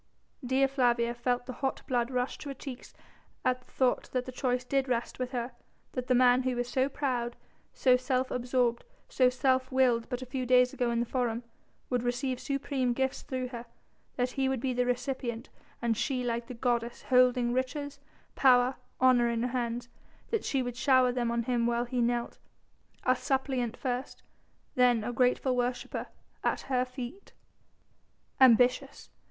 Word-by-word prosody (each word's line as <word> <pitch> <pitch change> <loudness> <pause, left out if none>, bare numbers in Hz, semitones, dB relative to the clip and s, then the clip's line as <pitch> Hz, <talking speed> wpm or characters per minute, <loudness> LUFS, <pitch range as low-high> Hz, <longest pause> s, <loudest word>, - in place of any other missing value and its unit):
Dea 260 +2 +3
Flavia 240 -3 +1
felt 245 +1 -1
the 255 - -6
hot 270 -1 -1
blood 240 -2 0
rush 250 -1 -2
to 290 - -7
her 275 - -5
cheeks 260 -1 -9 0.5
at 255 0 +1
thought 255 0 0
that 255 -1 0
the 255 - -6
choice 250 -1 -1
did 270 +1 0
rest 245 -1 -2
with 255 -1 -2
her, 245 -1 -3 0.4
that 250 -1 -4
the 255 - +3
man 250 0 +5
who 255 -1 -1
was 245 0 -2
so 260 +2 +1
proud, 250 -4 -2 0.4
so 255 -2 +4
self 255 0 -1
absorbed, 245 -1 0 0.3
so 255 -1 +4
self 260 +1 +1
willed 250 -3 +2
but 250 0 -3
a - - -7
few 255 0 -3
days 250 0 +4
ago 245 -1 0
in 235 0 +1
the - - 0
Forum, 240 -1 -1 0.5
would 250 -1 +1
receive 245 +1 -1
supreme 275 -3 -1
gifts 265 +1 -1
through 255 -1 -4
her; 240 -1 -8 0.5
that 250 0 0
he 265 0 0
would 265 -2 -1
be 255 +1 -1
the 245 0 0
recipient 250 -2 -3 0.3
and 230 -1 +2
she, 255 +2 -1
like 235 -1 -2
the 250 - -7
goddess 235 -1 -1
holding 250 -1 +3
riches, 280 +2 -3 0.3
power, 255 -1 +4 0.2
honour 250 -2 +5
in 235 0 -1
her 250 - 0
hands; 240 -1 -2 0.4
that 450 -2 0
she 270 -2 0
would 245 -1 -4
shower 255 -1 +4
them 245 -1 -1
on 235 0 0
him 235 -1 +1
while 235 0 0
he 245 0 -1
knelt 235 0 -1 0.6
a 255 - +3
suppliant 265 -3 -1
first, 255 0 -4 0.5
then 245 -3 +3
a 245 - -3
grateful 250 +1 +2
worshipper 245 0 -2 0.4
at - - 0
her 255 -2 0
feet. 255 +9 -8 1.1
Ambitious? 255 +2 +4
250 Hz, 175 wpm, -30 LUFS, 240-260 Hz, 1.1 s, man